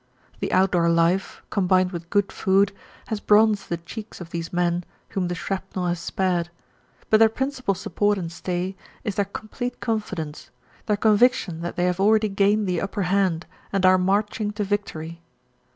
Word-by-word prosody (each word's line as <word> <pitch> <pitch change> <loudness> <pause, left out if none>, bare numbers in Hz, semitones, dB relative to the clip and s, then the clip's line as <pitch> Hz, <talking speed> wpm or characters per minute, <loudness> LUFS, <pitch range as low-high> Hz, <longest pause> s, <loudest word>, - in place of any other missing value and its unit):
The - - -2
outdoor 180 -3 +3
life, 170 +3 +1
combined 185 -2 +2
with 170 -2 -7
good 205 0 +1
food, 195 +1 +2 0.4
has 220 - -1
bronzed 210 -1 +3
the 170 - -1
cheeks 210 +6 -9
of 170 -2 -9
these 165 -1 -4
men 175 0 +1 0.3
whom 185 -2 -1
the 175 - -2
shrapnel 190 +1 -3
has 175 -1 0
spared, 175 -1 -1 0.6
but 215 - +6
their 225 0 +7
principal 260 -3 -1
support 205 +2 0
and 170 -3 -4
stay 180 +2 -3 0.3
is 205 - -2
their 200 +1 0
complete 245 +5 -6
confidence, 195 -9 -3 0.4
their 210 -2 +2
conviction 210 -5 +3
that 175 - -4
they 180 -1 +1
have 180 0 0
already 215 +2 +4
gained 200 +2 +2
the 180 -3 0
upper 195 0 -2
hand 185 -2 +1 0.3
and 195 -1 +1
are 185 0 +6
marching 205 +3 +1
to 210 0 -2
victory. 170 -5 -3
190 Hz, 170 wpm, -24 LUFS, 175-205 Hz, 0.6 s, their